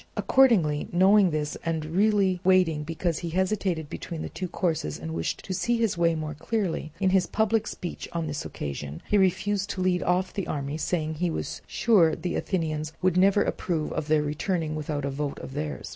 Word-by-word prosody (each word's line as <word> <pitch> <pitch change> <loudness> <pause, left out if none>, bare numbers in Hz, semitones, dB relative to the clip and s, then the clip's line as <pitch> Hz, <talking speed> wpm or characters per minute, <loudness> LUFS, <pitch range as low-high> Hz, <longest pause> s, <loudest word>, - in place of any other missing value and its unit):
Accordingly, 190 - +3
knowing 190 +2 +5
this 150 -2 -2
and 160 -2 -1
really 190 +2 +2
waiting 180 -5 +3
because 165 +1 -2
he 170 - -4
hesitated 185 -2 0
between 160 +2 -6
the - - -5
two 185 - -3
courses 160 - -1
and 80 0 -6
wished 80 0 -3
to 190 - -3
see 240 +6 +1
his 225 -4 +1
way 170 -1 +2
more 155 -1 -4
clearly, 165 0 -2
in 190 -2 +2
his 190 -1 +3
public 220 0 +1
speech 175 - -6
on 170 -1 -2
this 150 -1 -4
occasion 70 +2 -6
he 210 - +3
refused 195 +2 +1
to 185 - -3
lead 180 -1 +2
off 180 +1 0
the 195 - -3
army, 140 0 -3
saying 160 0 -1
he 170 +3 -1
was 160 - -4
sure 185 -9 +4
the 175 +1 -3
Athenians 155 -4 -2
would 185 -2 +3
never 195 +2 +4
approve 160 -4 -2
of 155 -1 -3
their 155 -1 +3
returning 155 +2 -1
without 150 -2 -3
a 140 - -2
vote 145 +1 -3
of 130 - -8
theirs. 150 +1 -4
170 Hz, 195 wpm, -26 LUFS, 155-190 Hz, -, knowing